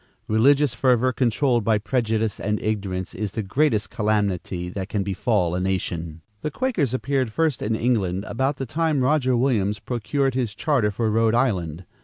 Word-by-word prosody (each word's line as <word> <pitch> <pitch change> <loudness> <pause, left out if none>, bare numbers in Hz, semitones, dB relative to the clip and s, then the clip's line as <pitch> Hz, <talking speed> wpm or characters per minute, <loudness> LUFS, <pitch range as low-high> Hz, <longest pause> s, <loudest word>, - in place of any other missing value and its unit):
Religious 135 +5 +4
fervor 125 +1 +2
controlled 120 0 +1
by 110 0 +3
prejudice 110 -1 -1
and 105 0 -1
ignorance 95 -4 -2
is 105 -3 -4
the 110 - -2
greatest 110 +1 +1
calamity 100 -4 -1
that 95 +2 -5
can 105 -2 -1
befall 95 -2 0
a 90 - -1
nation. 85 -4 -3 0.2
The - - -2
Quakers 175 - -1
appeared 130 -3 -1
first 155 0 0
in 110 +1 0
England 100 -6 0
about 135 +4 -1
the 135 - -3
time 155 +2 0
Roger 130 -2 +2
Williams 110 -5 +1
procured 130 +4 -1
his 120 -5 -2
charter 130 -5 +1
for 110 +2 -1
Rhode 115 +1 +2
Island. 90 - 0
110 Hz, 165 wpm, -23 LUFS, 100-130 Hz, 0.2 s, Religious